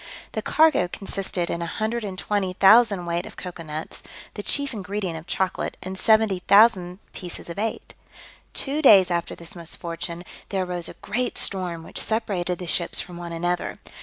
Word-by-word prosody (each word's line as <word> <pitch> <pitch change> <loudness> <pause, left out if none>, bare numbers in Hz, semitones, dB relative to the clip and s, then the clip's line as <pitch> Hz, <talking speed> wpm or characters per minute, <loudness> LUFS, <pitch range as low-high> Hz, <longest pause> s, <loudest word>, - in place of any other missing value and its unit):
The - - -3
cargo 310 - +4
consisted 190 -2 -3
in 170 - -2
120,000 205 0 +2
weight 170 +1 -1
of - - -13
cocoa 180 -2 -7
nuts, 155 0 -6 0.3
the 205 - -5
chief 280 +5 +1
ingredient 200 -3 -3
of 160 +1 -9
chocolate, 190 +1 -2
and 185 +1 -5
70,000 200 -2 +4 0.2
pieces 175 -2 -7
of 170 - -6
eight. 220 +1 -3 0.6
Two 290 +2 -1
days 195 - +7
after 170 0 -1
this 170 +1 -6
misfortune, 170 0 -5 0.3
there 190 -2 0
arose 175 -1 -2
a - - -10
great 250 +2 -1
storm, 180 -4 -1
which - - -3
separated 195 -6 0
the 180 - -6
ships 170 0 +1
from 175 -1 -6
one 170 -1 -7
another. 175 +1 -2
185 Hz, 155 wpm, -24 LUFS, 175-210 Hz, 0.6 s, days